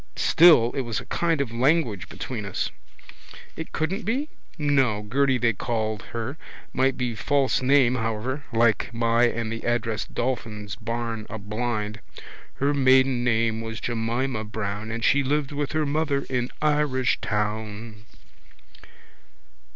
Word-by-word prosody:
Still 155 -9 +6
it 135 - -2
was 120 -3 -3
a - - -9
kind 165 -4 0
of 130 -5 -3
language 125 - +1
between 120 -5 -5
us. 100 -1 -2 0.8
It 160 - -7
couldn't 185 +7 -1
be? 265 +8 -1 0.3
No, 135 -8 +2
Gerty 130 +4 +2
they 115 -1 +2
called 110 0 -2
her. 120 +6 -4 0.4
Might 135 0 +2
be 125 -2 -1
false 135 +5 +1
name 130 -1 +4
however 120 +4 -2
like 115 -2 +2
my 115 +1 +3
name 120 - -3
and 115 -1 -2
the 115 - -5
address 115 -2 -1
Dolphin's 105 -5 -3
barn 115 -1 -4
a 110 - -5
blind. 110 +1 -3 0.6
Her 140 +2 +1
maiden 130 -2 +4
name 115 -2 +1
was 115 0 -5
Jemina 120 +1 -1
Brown 105 0 -4
And 115 0 -4
she 140 - +4
lived 140 +1 0
with 145 0 -3
her 155 -1 +1
mother 145 -1 0
in 125 -1 0
Irishtown. 110 -7 -1
120 Hz, 140 wpm, -25 LUFS, 110-140 Hz, 0.8 s, Still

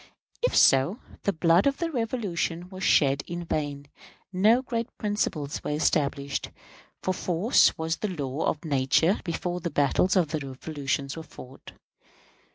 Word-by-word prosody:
If - - +1
so, 135 - +4 0.3
the 200 - +3
blood 170 - +3
of 275 - +1
the 335 -1 -2
Revolution 200 - -2
was 190 0 -8
shed 140 -4 +3
in 175 0 -5
vain; 145 -3 -3 0.5
no 220 +7 +4
great 235 -2 -2
principles 170 -9 -2
were - - -3
established; 140 -2 0 0.5
for 185 - 0
force 185 +6 +3
was 160 0 -2
the 215 - -2
law 145 -5 -3
of 150 - -2
nature 145 +6 +2
before 175 +1 -3
the 170 - -3
battles 145 +6 +2
of 175 -5 +3
the 155 0 -2
Revolution 140 0 -3
were 165 - -6
fought. 135 -4 -13
165 Hz, 150 wpm, -26 LUFS, 145-190 Hz, 0.5 s, so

